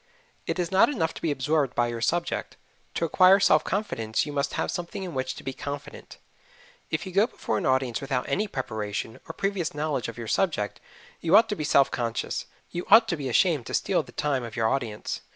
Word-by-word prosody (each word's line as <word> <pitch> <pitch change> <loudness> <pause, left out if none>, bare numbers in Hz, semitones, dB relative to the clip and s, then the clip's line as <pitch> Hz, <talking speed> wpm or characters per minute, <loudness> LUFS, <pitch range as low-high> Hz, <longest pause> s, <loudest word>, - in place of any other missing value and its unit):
It - - -1
is 175 -1 -1
not 190 +7 +5
enough 160 - -1
to - - -10
be 165 - 0
absorbed 145 -1 0
by 120 - +3
your 120 -1 -4
subject 170 +8 -1 0.4
to 165 - +1
acquire 185 +4 +6
self 155 -5 +4
confidence 115 - -1
you 145 - -6
must 140 0 -1
have - - -1
something 175 +2 -5
in 180 -3 -6
which 130 0 -2
to - - -10
be 135 - -4
confident. 140 +1 -7 0.7
If 160 +3 -2
you 190 - -6
go 200 +5 +4
before 110 - -2
an - - -1
audience 130 -3 +1
without 135 -2 -2
any 200 +10 0
preparation, 110 - -4
or - - -4
previous 195 -4 -2
knowledge 150 -4 -1
of 115 - -7
your 115 -1 -6
subject, 130 - 0 0.4
you 165 - +5
ought 225 +1 +5
to 210 - -1
be 155 - -4
self 140 -2 +4
conscious 115 -2 -2 0.2
you 175 - -5
ought 225 0 +8
to 170 - +1
be 140 -4 -4
ashamed 150 0 +2
to - - -2
steal - - +1
the - - -14
time 140 -4 -1
of 115 -2 -7
your 115 -1 +2
audience. 120 -6 -3
145 Hz, 220 wpm, -26 LUFS, 120-175 Hz, 0.7 s, ought